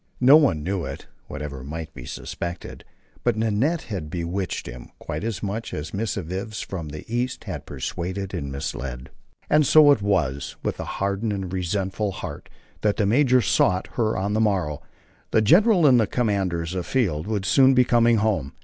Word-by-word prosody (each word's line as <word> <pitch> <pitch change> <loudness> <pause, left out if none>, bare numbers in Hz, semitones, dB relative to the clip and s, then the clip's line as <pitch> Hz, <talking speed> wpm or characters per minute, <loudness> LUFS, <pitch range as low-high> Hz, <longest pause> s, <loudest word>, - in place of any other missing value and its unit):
No 130 +3 +8
one 135 - +3
knew 95 0 -2
it, 70 -1 -6 0.2
whatever 70 -2 -6
might 80 +3 -6
be 60 -3 -10
suspected, 85 0 -6 0.4
but 120 -2 +2
Nanette 115 +10 +1
had 95 -9 -5
bewitched 90 +3 -3
him 60 0 -9
quite - - -5
as 110 -4 -3
much 105 +3 -4
as 75 0 -6
missives 100 0 -3
from 85 -5 -6
the 75 +1 -8
East 120 +2 -2
had 90 - -6
persuaded 95 +3 -4
and 70 -1 -4
misled. 65 -2 -5 0.4
And 150 0 +4
so 150 +1 +7
it 140 - +3
was 80 -9 0
with - - -2
hardened 100 +2 -2
and 95 -2 -4
resentful 95 +2 -1
heart 85 -6 -7 0.3
that 105 -1 +1
the 105 - +2
major 125 +3 +4
sought 90 0 +2
her 110 -2 0
on 100 +2 -1
the 110 - +2
morrow. 90 -9 0 0.5
The 110 - +3
general 180 - +5
and 130 -4 +6
the 110 - +2
commands 95 -8 -1
afield 90 - -1
would 105 -3 -2
soon 135 +5 +5
be 125 - +6
coming 120 -1 +4
home. 105 -10 0
100 Hz, 170 wpm, -24 LUFS, 85-115 Hz, 0.5 s, No